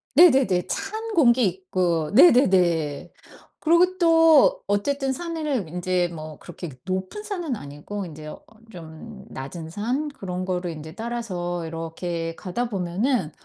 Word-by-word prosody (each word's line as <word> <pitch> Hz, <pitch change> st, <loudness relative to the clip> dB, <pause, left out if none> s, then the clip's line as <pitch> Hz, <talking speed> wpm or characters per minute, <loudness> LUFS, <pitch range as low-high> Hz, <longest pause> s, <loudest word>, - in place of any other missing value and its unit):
네네네. 265 Hz, -, +5 dB
찬 435 Hz, +3 st, -4 dB
공기 250 Hz, -, +4 dB
있고 180 Hz, -3 st, -1 dB
네네네. 180 Hz, -, +4 dB, 0.5 s
그리고 350 Hz, +3 st, +3 dB
또 325 Hz, -3 st, +5 dB
어쨌든 270 Hz, +7 st, 0 dB
산에는 305 Hz, -, -3 dB
인제 180 Hz, +1 st, 0 dB
뭐 155 Hz, -2 st, -9 dB
그렇게 175 Hz, 0 st, -8 dB
그 130 Hz, -, -14 dB
높은 185 Hz, -, -3 dB
산은 355 Hz, -, -3 dB
아니고 150 Hz, +6 st, -7 dB
인제 155 Hz, -2 st, -10 dB
어 155 Hz, -, -8 dB, 0.3 s
좀 180 Hz, +5 st, -11 dB
낮은 160 Hz, +5 st, -7 dB
산 245 Hz, -, -2 dB
그런 185 Hz, -9 st, -5 dB
거를 180 Hz, -1 st, -2 dB
인제 155 Hz, 0 st, -9 dB
따라서 185 Hz, -8 st, -4 dB
이렇게 165 Hz, +1 st, -4 dB
가다 215 Hz, +8 st, -3 dB
보면은 190 Hz, -, -1 dB
190 Hz, 265 characters per minute, -24 LUFS, 170-270 Hz, 0.5 s, 네네네